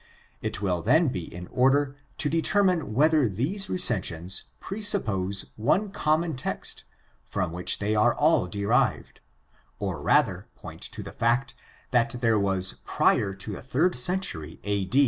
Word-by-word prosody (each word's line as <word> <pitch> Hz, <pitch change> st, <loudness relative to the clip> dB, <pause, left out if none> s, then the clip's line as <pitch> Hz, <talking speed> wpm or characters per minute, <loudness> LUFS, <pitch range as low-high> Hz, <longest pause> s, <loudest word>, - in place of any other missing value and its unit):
It 100 Hz, -, -3 dB
will 90 Hz, -3 st, 0 dB
then 155 Hz, -, +3 dB
be 90 Hz, -8 st, -5 dB
in 90 Hz, +1 st, -8 dB
order 135 Hz, +2 st, +2 dB, 0.2 s
to -, -, +1 dB
determine 170 Hz, -, +2 dB
whether 150 Hz, -2 st, +4 dB
these 165 Hz, -, -2 dB
recensions 95 Hz, -, -1 dB
presuppose 110 Hz, -, -1 dB
one 190 Hz, -, +1 dB
common 155 Hz, 0 st, 0 dB
text 130 Hz, -, -4 dB, 0.4 s
from 90 Hz, -2 st, -3 dB
which 90 Hz, +1 st, +2 dB
they 105 Hz, +1 st, -1 dB
are 110 Hz, +3 st, +3 dB
all 150 Hz, -, +3 dB
derived, 100 Hz, +2 st, 0 dB, 0.6 s
or 95 Hz, -7 st, -4 dB
rather -, -, +2 dB
point -, -, -11 dB
to -, -, -5 dB
the -, -, -8 dB
fact 125 Hz, +4 st, +1 dB, 0.4 s
that 120 Hz, -1 st, +2 dB
there 115 Hz, -3 st, +2 dB
was 95 Hz, -1 st, +1 dB
prior 100 Hz, -2 st, +1 dB
to 100 Hz, +2 st, -4 dB
the 100 Hz, -, -6 dB
third 150 Hz, +9 st, +1 dB
century 125 Hz, -, -2 dB
a. 100 Hz, -2 st, -1 dB
120 Hz, 145 wpm, -26 LUFS, 95-155 Hz, 0.6 s, whether